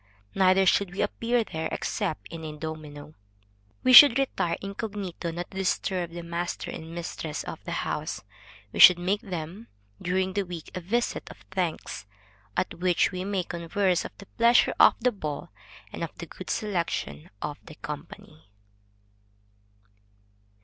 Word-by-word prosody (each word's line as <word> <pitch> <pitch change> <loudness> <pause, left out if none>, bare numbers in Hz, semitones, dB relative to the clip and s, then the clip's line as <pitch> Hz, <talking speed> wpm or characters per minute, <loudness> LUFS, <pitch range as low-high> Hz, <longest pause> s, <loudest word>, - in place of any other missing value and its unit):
Neither 190 0 +4
should 190 0 +3
we 195 - 0
appear 230 +3 0
there 160 -5 -4
except 100 0 -2
in 165 -1 -8
a 155 -1 -6
domino. 155 -1 -7 0.7
We 255 - +5
should 265 -1 +11
retire 265 -10 0
incognito, 200 -3 -5
not 170 +1 -5
to 190 - -9
disturb 185 -2 0
the 170 0 -7
master 170 +1 -4
and 165 +1 -8
mistress 165 -2 -4
of - - -8
the - - -5
house; - - -3 0.5
we - - -4
should 180 -1 +10
make 190 +4 0
them 180 +4 -6 0.3
during 185 +1 0
the 200 - +1
week, 175 -4 -7
a 185 - -4
visit 235 +8 -1
of - - -11
thanks, 175 - -3 0.5
at - - 0
which 180 -1 +2
we 185 -1 -4
may 195 -1 -1
converse 175 +2 0
of - - -9
the 200 - -11
pleasure 235 +4 +4
of - - +8
the 250 +2 +3
ball 155 -9 -5 0.4
and - - -4
of - - -6
the - - -6
good - - -10
selection 170 - -2
of 150 +4 -5
the 155 - -10
company. 150 - -9
180 Hz, 155 wpm, -27 LUFS, 160-200 Hz, 0.7 s, should